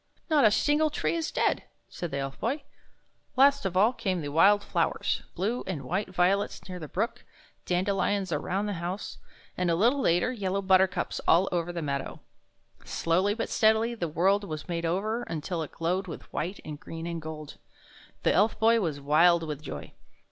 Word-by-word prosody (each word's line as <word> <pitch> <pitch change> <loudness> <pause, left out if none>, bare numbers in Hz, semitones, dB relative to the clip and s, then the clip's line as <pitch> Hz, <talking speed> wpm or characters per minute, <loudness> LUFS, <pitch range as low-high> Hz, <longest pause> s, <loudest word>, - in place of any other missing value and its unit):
" - - -38
Not 295 -5 +5
a - - +8
single 295 +8 +2
tree 300 - -1
is 330 -1 -1
dead," - - +1 0.3
said 175 - -6
the 140 - -3
Elf 135 0 -4
Boy. 275 +6 -1 0.7
Last 275 -4 +5
of 185 -1 -3
all 215 +6 +5
came 195 -7 -2
the 145 -1 -4
wild 200 +7 +5
flowers - - 0
— - - -39
blue 220 +7 -1
and 165 -7 -3
white 185 +9 -2
violets 185 +3 0
near 180 -1 -6
the 155 - -7
brook, 220 - -3 0.4
dandelions 190 +1 0
around 185 +6 -1
the 205 - -2
house, 180 +4 -5 0.4
and, 180 -1 0
a 165 - +3
little 240 +10 +3
later, 175 +4 +2
yellow 200 -4 -2
buttercups 190 -1 +2
all 180 +4 +5
over 175 -1 -1
the 170 -2 -4
meadow. 140 -2 -3 0.6
Slowly 185 +5 +1
but 230 - -2
steadily 220 +2 +3
the 180 -8 -3
world 190 +6 +2
was 155 -5 -6
made 170 -1 -2
over, 215 +7 -1
until 165 -3 -4
it 155 - -5
glowed 180 +3 -1
with 165 - -9
white 180 +6 -3
and 150 -1 -7
green 165 +1 -7
and 170 -1 -4
gold. 155 -1 -8 0.7
The - - +3
Elf 215 - +3
Boy 230 +1 +4
was 160 -8 -2
wild 165 +4 +4
with 150 -2 -5
joy. 75 - -8
185 Hz, 190 wpm, -28 LUFS, 165-210 Hz, 0.7 s, a